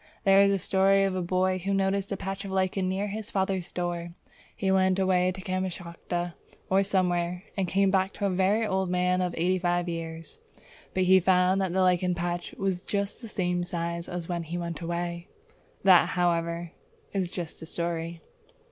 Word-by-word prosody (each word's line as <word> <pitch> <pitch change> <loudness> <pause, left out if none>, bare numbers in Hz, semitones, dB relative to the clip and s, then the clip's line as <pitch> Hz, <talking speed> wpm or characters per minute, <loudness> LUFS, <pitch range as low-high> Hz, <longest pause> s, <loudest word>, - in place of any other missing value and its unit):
There 195 -1 +6
is 200 0 +5
a 195 - +2
story 195 +1 +3
of 195 -1 +1
a 185 - -1
boy 185 +1 +1
who 195 +2 -1
noticed 195 +1 0
a 200 - -1
patch 195 +1 -4
of 200 - -6
lichen 190 0 0
near 195 +2 -1
his 215 +1 -5
father's 190 -2 -1
door. 175 -1 -3 0.4
He 195 -3 0
went 190 -1 +3
away 185 -1 +2
to 190 +1 -8
Kamschatka 175 -2 -3 0.4
or 190 +1 +5
somewhere 180 -2 0
and 195 -2 0
came 195 +2 +2
back 190 0 0
a 200 - +1
very 195 +5 +2
old 190 -3 0
man 180 0 +1
of 180 -1 -1
eighty 185 +3 +2
five 175 0 0
years; 165 -1 -6 0.6
but 185 - +3
he 190 +1 +6
found 185 +1 +3
that 190 -2 0
the 190 +1 +1
lichen 180 0 +2
patch 175 0 -3
was 190 -2 -1
just 200 +2 -3
the 230 - -7
same 180 -4 -1
size 170 -1 -4
as 175 -2 -4
when 175 -1 -2
he 170 +1 -5
went 170 -1 -4
away. 170 0 -3 0.6
That, 185 -2 +6
however, 170 -1 0 0.4
is 190 -3 0
just 175 -3 -6
a 160 - -7
story! 170 0 -3
185 Hz, 185 wpm, -27 LUFS, 175-190 Hz, 0.6 s, There